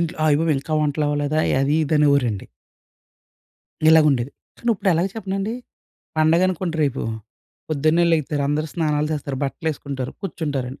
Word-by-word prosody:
ఇంట్లో 170 Hz, +1 st, -2 dB
అయ్యబాబోయ్! 155 Hz, 0 st, +3 dB
ఇంకా 155 Hz, -, -6 dB
వంటలవ్వలేదా 145 Hz, 0 st, 0 dB, 0.2 s
అది 140 Hz, +2 st, +1 dB
ఇదనేవోరండి. 140 Hz, -8 st, +2 dB, 1.4 s
ఇలాగుండేది. 150 Hz, -6 st, +4 dB, 0.3 s
కానిప్పుడెలాగా 190 Hz, -6 st, +1 dB
చెప్పనండి! 195 Hz, 0 st, -3 dB, 0.6 s
పండగనుకోండి 170 Hz, +2 st, +2 dB
రేపు, 140 Hz, -3 st, 0 dB, 0.7 s
పొద్దున్నే 155 Hz, +3 st, +2 dB
లెగిత్తారు. 150 Hz, -2 st, 0 dB
అందరూ 150 Hz, +2 st, 0 dB
స్నానాలు 150 Hz, -3 st, 0 dB
చేస్తారు. 140 Hz, -2 st, -3 dB
బట్టలేసుకుంటారు, 140 Hz, -3 st, -4 dB
కుర్చుంటారండి. 145 Hz, -8 st, -4 dB
155 Hz, 100 wpm, -22 LUFS, 140-165 Hz, 1.4 s, ఇలాగుండేది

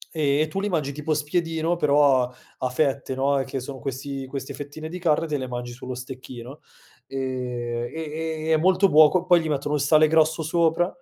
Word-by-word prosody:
e 150 Hz, 0 st, +2 dB
tu 195 Hz, +5 st, -3 dB
li 205 Hz, -, -1 dB
mangi 150 Hz, -6 st, -1 dB
tipo 150 Hz, +2 st, -2 dB
spiedino, 165 Hz, +2 st, -1 dB
però 145 Hz, -4 st, +4 dB
a 125 Hz, -, -5 dB, 0.3 s
a 130 Hz, -, -1 dB
fette, 135 Hz, 0 st, -1 dB
no. 140 Hz, +1 st, +1 dB
E -, -, 0 dB
che 135 Hz, +1 st, -4 dB
sono 130 Hz, +1 st, -7 dB
questi 135 Hz, +1 st, -5 dB
queste 135 Hz, 0 st, -6 dB
fettine 145 Hz, +2 st, -7 dB
di 180 Hz, -, -6 dB
carne, 165 Hz, -1 st, +1 dB
te 150 Hz, -2 st, -1 dB
le 130 Hz, -, -4 dB
mangi 120 Hz, -1 st, -5 dB
sullo 130 Hz, +1 st, -7 dB
stecchino 125 Hz, +1 st, -9 dB, 0.5 s
e 125 Hz, -3 st, -3 dB
e 160 Hz, 0 st, -4 dB
e -, -, +4 dB
è -, -, +5 dB
molto 185 Hz, +4 st, +4 dB
buo 155 Hz, +3 st, +5 dB
poi 175 Hz, -2 st, +5 dB
gli 160 Hz, -, -3 dB
mettono 145 Hz, 0 st, -1 dB
il 145 Hz, -, 0 dB
sale 155 Hz, +2 st, +5 dB
grosso 160 Hz, +1 st, +3 dB
sopra, 165 Hz, +2 st, +2 dB
145 Hz, 200 wpm, -24 LUFS, 130-160 Hz, 0.5 s, è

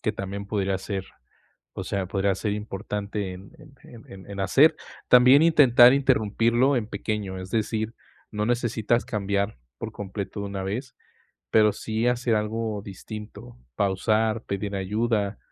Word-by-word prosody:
que 110 Hz, -, 0 dB
también 100 Hz, 0 st, -6 dB
podría 100 Hz, -2 st, -1 dB
ser, 95 Hz, -1 st, -4 dB, 0.7 s
o -, -, -5 dB
sea, 95 Hz, -2 st, -2 dB
podría 95 Hz, 0 st, 0 dB
ser 100 Hz, +2 st, -2 dB
importante 105 Hz, -1 st, -4 dB
en 95 Hz, +2 st, -13 dB, 0.3 s
en 115 Hz, -3 st, -13 dB
en 95 Hz, +1 st, -12 dB
en 100 Hz, -1 st, -5 dB
hacer. 140 Hz, -, +4 dB, 0.3 s
También 125 Hz, +4 st, +7 dB
intentar 125 Hz, -6 st, +7 dB
interrumpirlo 120 Hz, 0 st, +2 dB
en 110 Hz, -3 st, -1 dB
pequeño, 100 Hz, -2 st, -4 dB
es 95 Hz, +1 st, -9 dB
decir, 110 Hz, 0 st, -1 dB, 0.4 s
no 105 Hz, 0 st, -1 dB
necesitas 120 Hz, -1 st, 0 dB
cambiar 100 Hz, 0 st, -2 dB, 0.2 s
por -, -, -6 dB
completo 100 Hz, +1 st, -6 dB
de 100 Hz, -, -3 dB
una 100 Hz, -1 st, -5 dB
vez, 120 Hz, +7 st, -5 dB, 0.5 s
pero 105 Hz, -1 st, +5 dB
sí, 110 Hz, +2 st, -2 dB
hacer 125 Hz, -1 st, +1 dB
algo 105 Hz, 0 st, -2 dB
distinto, 100 Hz, -, -9 dB, 0.2 s
pausar, 110 Hz, +3 st, +1 dB
pedir 100 Hz, +1 st, -4 dB
ayuda, 105 Hz, +1 st, -1 dB
105 Hz, 145 wpm, -25 LUFS, 100-115 Hz, 0.7 s, También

